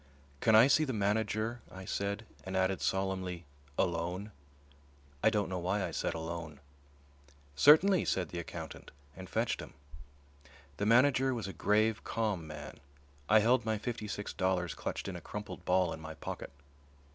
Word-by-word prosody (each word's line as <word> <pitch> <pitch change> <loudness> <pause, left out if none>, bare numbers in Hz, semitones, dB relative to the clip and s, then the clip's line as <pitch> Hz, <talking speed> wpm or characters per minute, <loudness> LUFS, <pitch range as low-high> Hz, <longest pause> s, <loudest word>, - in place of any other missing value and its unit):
"Can 110 +6 +4
I 110 +2 +9
see 150 +3 +4
the 135 -4 -2
manager?" 110 +2 0
I 95 0 -9
said, 100 +4 -2 0.2
and 95 0 -3
added 95 0 +1
solemnly, 95 -3 -1 0.3
"alone." 90 +3 -1 0.9
I - - +5
don't 105 -2 0
know 95 -1 -3
why 95 +3 0
I - - -6
said - - -2
"alone." 80 -2 -5 1.0
"Certainly," 160 - +6
said 95 -1 0
the 85 - -5
accountant, 85 - -7 0.3
and 95 0 -9
fetched - - 0
him. - - -11 1.0
The 100 - 0
manager 130 +2 +4
was 110 -5 -4
a 95 - -6
grave, 110 +1 +2
calm 105 -8 -2
man. 75 -2 -8 0.5
I 110 +1 +7
held 120 +3 +3
my 110 -1 0
fifty 110 0 -4
six 105 0 -4
dollars 90 -3 0
clutched - - -4
in 95 - -4
a 90 - -7
crumpled 105 +5 -7
ball 90 -1 +2
in - - -7
my 80 0 -7
pocket. - - -6
100 Hz, 160 wpm, -32 LUFS, 90-110 Hz, 1.0 s, I